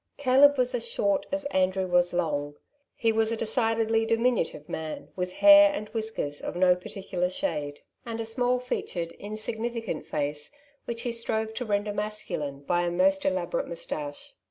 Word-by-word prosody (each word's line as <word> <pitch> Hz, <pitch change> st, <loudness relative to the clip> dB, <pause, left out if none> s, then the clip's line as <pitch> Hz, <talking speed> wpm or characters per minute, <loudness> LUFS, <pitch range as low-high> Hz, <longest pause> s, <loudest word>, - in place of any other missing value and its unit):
Caleb 285 Hz, +1 st, +5 dB
was 250 Hz, 0 st, +1 dB
as 235 Hz, -1 st, -2 dB
short 200 Hz, -3 st, 0 dB
as 290 Hz, 0 st, -2 dB
Andrew 190 Hz, 0 st, +2 dB
was 175 Hz, -1 st, +2 dB
long. 145 Hz, -4 st, -1 dB, 0.4 s
He 225 Hz, -2 st, +2 dB
was 220 Hz, 0 st, +1 dB
a 230 Hz, -, -1 dB
decidedly 225 Hz, 0 st, +1 dB
diminutive 225 Hz, -9 st, 0 dB
man, 155 Hz, -1 st, -5 dB
with 180 Hz, 0 st, -3 dB
hair 300 Hz, 0 st, +9 dB
and 215 Hz, -8 st, -5 dB
whiskers 220 Hz, -10 st, -3 dB
of -, -, -5 dB
no 180 Hz, 0 st, +5 dB
particular 180 Hz, -1 st, -3 dB
shade, 150 Hz, -, -3 dB, 0.2 s
and 230 Hz, -2 st, -5 dB
a 225 Hz, -, -2 dB
small 245 Hz, +2 st, +1 dB
featured, 175 Hz, -9 st, -4 dB
insig 215 Hz, +2 st, -5 dB
nificant 230 Hz, -6 st, -3 dB
face, 145 Hz, 0 st, -2 dB, 0.3 s
which 235 Hz, 0 st, -4 dB
he 245 Hz, -, -1 dB
strove 220 Hz, -1 st, -1 dB
to 245 Hz, +3 st, -4 dB
render 205 Hz, -1 st, 0 dB
masculine 205 Hz, -9 st, -3 dB
by 175 Hz, +4 st, +1 dB
a 175 Hz, -, 0 dB
most 285 Hz, +10 st, +2 dB
elaborate 290 Hz, +13 st, -1 dB
moustache. 150 Hz, -, -5 dB
220 Hz, 165 wpm, -27 LUFS, 180-245 Hz, 0.4 s, hair